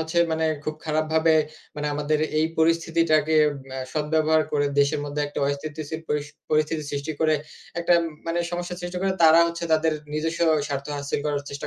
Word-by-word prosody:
হচ্ছে 160 +2 -1
মানে 160 0 +1 0.2
খুব 155 - -2
খারাপভাবে 160 +1 +2 0.4
মানে 150 0 -2
আমাদের 150 +1 0 0.2
এই 160 - +3
পরিস্থিতিটাকে 160 -1 +2 0.3
অ্যা 130 - -5
সদব্যবহার 155 +1 +2
করে 145 -1 +2
দেশের 145 +1 +2
মধ্যে 145 0 -3
একটা 145 - -6
অস্থিতিশীল 155 +2 -4
পরিস 150 0 -1 0.2
পরিস্থিতি 155 +1 +1
সৃষ্টি 145 +2 -3
করে 155 -1 +3 0.5
একটা 170 +1 +4 0.3
মানে 165 +1 -1
সমস্যা 175 0 -4
সৃষ্টি 175 0 -4
করে 195 - +1
তারা 160 +1 +8
হচ্ছে 170 0 -4
তাদের 160 0 +3 0.2
নিজস্ব 160 +2 -2 0.3
স্বার্থ 140 -1 -3
হাসিল 140 0 -2
করার 145 -1 -1
চেষ্টা 140 - -5
155 Hz, 165 wpm, -24 LUFS, 150-160 Hz, 0.5 s, তারা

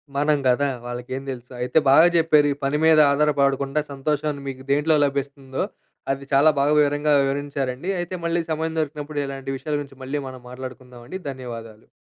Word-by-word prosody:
మనం 150 +1 +2
గదా! 130 +3 +3 0.2
వాళ్ళకేందెలుసు. 125 +1 -6
అయితే 125 - 0
బాగా 155 +5 +8
చెప్పారు 155 -3 +4
ఈ - - -13
పని 140 +2 +1
మీద 160 -1 +6
ఆధారపడకుండా 140 0 +2
సంతోషాన్ని 145 +1 -2
మీకు 130 -1 -6
దేంట్లో 150 +3 +3
లభిస్తుందో, 140 -1 -3 0.5
అది 135 0 -3
చాలా 140 +3 +6
బాగా 145 +2 +3
వివరంగా 145 +1 +2
వివరించారండి. 140 +2 -2
అయితే 175 +1 -4
మళ్ళీ 170 +1 +1
సమయం 160 +1 -1
దొరికినప్పుడు 150 -1 -3
ఇలాంటి 135 0 -5
విషయాల 150 +2 -3
గురించి 140 -2 -9
మళ్ళీ 140 +3 -2
మనం 130 -1 -10
మాట్లాడుకుందామండి. 125 +3 -8
ధన్యవాదాలు. 115 -4 -9
140 Hz, 150 wpm, -23 LUFS, 130-150 Hz, 0.5 s, బాగా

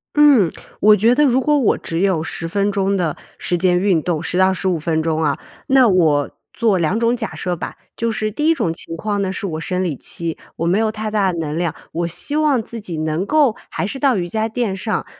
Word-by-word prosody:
嗯， 280 - +5 0.3
我 210 0 +6
觉 225 +5 +3
得 295 +2 +4
如 260 -1 +3
果 295 +2 +2
我 260 -7 +2
只 165 0 -4
有 190 -5 +2
10 165 +1 -4
分 200 +3 0
钟 195 0 0
的 170 -5 -1 0.2
时 175 - -1
间 180 0 +2
运 185 -3 +2
动， 160 -2 -1
10 180 - -2
到 190 0 +4
15 185 -2 0
分 160 0 0
钟 160 0 0
啊， 145 -2 0 0.3
那 265 -2 +5
我 160 -7 +3 0.2
做 220 -4 +2
2 180 +6 0
种 235 +1 +2
假 - - -4
设 180 -1 -2
吧。 - - -6 0.2
就 230 0 -1
是 215 -1 -2
第 300 +8 -1
1 330 - +5
种 165 - -1
情 165 0 -7
况 205 +3 -2
呢， 190 -1 -1
是 195 - -4
我 160 -4 -4
生 180 +2 -1
理 170 -6 -1
期， 165 +5 -4 0.2
我 165 - -3
没 185 +5 +2
有 220 -1 +1
太 215 0 -4
大 200 -3 +2
的 170 - -5
能 155 -2 -3
量， 170 -2 -1 0.2
我 170 +1 -2
希 175 - -4
望 300 -5 +2
自 230 +1 -7
己 175 -5 -5
能 155 +2 -1
够 290 0 +3
还 165 - -3
是 265 +7 -4
到 270 -6 +3
瑜 175 -2 -2
伽 220 +4 -1
垫 220 -4 -1
上， 195 +1 -2
190 Hz, 240 characters per minute, -19 LUFS, 170-225 Hz, 0.3 s, 我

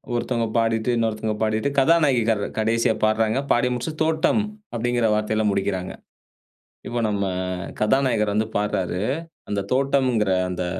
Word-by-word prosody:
ஒருத்தவங்க 120 -1 -1
பாடிட்டு, 115 0 +1
இன்னொருத்தவங்க 110 -1 -1
பாடிட்டு, 110 +4 0
கதாநாயகி 140 -4 +4
கர் 105 -2 +1 0.2
கடைசியா 115 +1 +2
பாட்றாங்க. 110 +2 +1
பாடி 120 +1 +3
முடிச்சுட்டு, 155 +6 -4
"தோட்டம்" 160 +6 +2 0.3
அப்டிங்கிற 120 0 +1
வார்த்தைல, 110 0 0
முடிக்கிறாங்க. 95 -2 -2 0.9
இப்ப 120 0 -2
நம்ம, 100 -1 -1 0.6
கதாநாயகர் 105 -3 +2
வந்து 110 +1 +1
பாட்றாரு. 95 -3 -1 0.5
அந்த 100 -1 -1
தோட்டம்ங்கிற 130 -6 +2 0.2
அந்த 90 0 -3
115 Hz, 120 wpm, -23 LUFS, 105-125 Hz, 0.9 s, கதாநாயகி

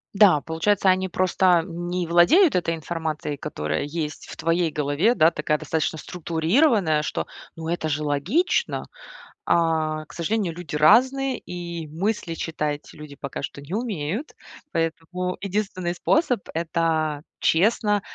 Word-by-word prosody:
Да, 195 -8 +6
получается, 190 +6 +1
они 185 0 +2
просто 180 -1 +3
не 175 0 -3
владеют 255 - +5
этой 170 -2 +1
информацией, 160 -2 -4
которая 75 - -3
есть 150 0 -4
в - - -9
твоей 165 0 +1
голове, 150 - +1
да, 165 -1 +5
такая, 150 -1 0
достаточно 160 0 -2
структурированная, 170 - +1
что, 150 - -3 0.3
ну, 160 -1 -6
это 165 -2 -1
же 150 0 -1
логично. 155 - 0 0.6
А, 160 -2 +1
к - - -16
сожалению, 175 +1 -1
люди 165 -4 -6
разные, 260 - +4
и 170 -2 -6
мысли 170 +2 -2
читать 150 -2 -3
люди 150 -2 -11
пока 140 - -5
что 140 - -6
не 150 +7 -7
умеют. 215 - -3 0.3
Поэтому 165 +2 -2
единственный 190 -3 -2
способ- 255 - +2
это 160 -2 0 0.2
честно, 210 +4 +3
170 Hz, 130 wpm, -24 LUFS, 155-190 Hz, 0.6 s, Да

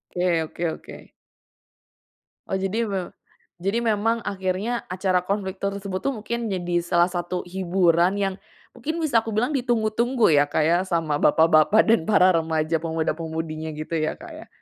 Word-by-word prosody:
Oke 175 -2 +1
oke 165 +2 -7
oke. - - -11 1.4
Oh, 190 - -1
jadi 200 +4 -1
mem 190 -3 -3 0.5
jadi 200 +6 -1
memang 225 +1 +1
akhirnya 195 +4 -2
acara 185 0 0
konflik 195 -1 -2
tersebut 200 -1 -3
tuh 275 - -1
mungkin 235 +2 -3
jadi 175 -3 -1
salah 175 +1 +2
satu 175 0 -3
hiburan 180 -1 +2
yang 195 -1 -1 0.4
mungkin 325 +3 -4
bisa 245 -7 +3
aku 225 - -4
bilang 245 +6 +1
ditunggu-tunggu 240 - +1
ya 145 0 +5
Kak, 150 - 0
ya, 170 +3 +3
sama 165 -4 0
bapak-bapak 160 +7 +5
dan 225 -8 +2
para 185 -3 +5
remaja 160 0 0
pemuda-pemudinya 160 -1 -3
gitu 155 +2 -4
ya 155 - -1
Kak 335 +1 -12
ya? 315 +1 -11
185 Hz, 150 wpm, -24 LUFS, 165-220 Hz, 1.4 s, ya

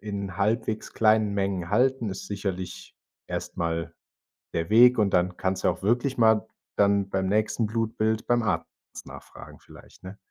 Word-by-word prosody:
in 100 -2 -5
halbwegs 110 +2 -1
kleinen 110 -2 +3
Mengen 95 -3 -2
halten, 125 +1 +2
ist 95 - -7
sicherlich 95 -3 -5 0.3
erst - - -5
mal 85 0 -2 0.6
der 85 +3 -2
Weg 125 +3 +6
und 105 -2 +3
dann 90 0 +1
kannst 95 0 -2
du - - +4
auch - - -2
wirklich 120 +5 0
mal 110 -1 +4 0.3
dann 100 -1 +2
beim 95 0 -1
nächsten 110 +2 0
Blutbild 110 0 -1
beim 120 -1 +2
Arzt 80 -6 -1 0.4
nachfragen - - -12
vielleicht, - - -17
ne? 95 +2 -9
105 Hz, 155 wpm, -26 LUFS, 95-110 Hz, 0.6 s, Weg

